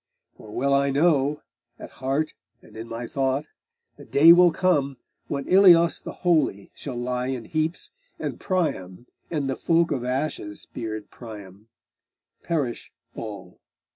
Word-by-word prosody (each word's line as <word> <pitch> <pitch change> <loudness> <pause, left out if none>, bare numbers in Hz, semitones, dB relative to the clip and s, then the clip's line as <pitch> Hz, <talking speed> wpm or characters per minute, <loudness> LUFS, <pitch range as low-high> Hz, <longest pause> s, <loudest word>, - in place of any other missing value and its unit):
For 110 - -14
well 135 +6 0
I 140 0 +3
know, 145 0 +2 0.3
at - - -10
heart 140 +4 -1 0.3
and 110 - -17
in 110 +1 -7
my 115 +1 -5
thought, 135 +3 -1 0.5
The - - -12
day 160 +4 +7
will 175 0 +6
come 145 -7 +1 0.3
when 140 -1 -4
Ilios 175 -3 +6
the - - -7
holy 155 - +1
Shall 135 -4 -7
lie 125 +1 -2
in 130 -3 -4
heaps, 155 +2 -2 0.3
and - - -5
Priam, 120 - -2 0.2
and 150 -5 -2
the 135 - -1
folk 170 0 +2
Of 130 -4 -1
ashen 125 -5 -3
speared 110 -2 -7
Priam, 105 -3 -11 0.7
perish 145 -8 -3 0.2
all. 105 -3 -8
135 Hz, 140 wpm, -24 LUFS, 115-160 Hz, 0.7 s, day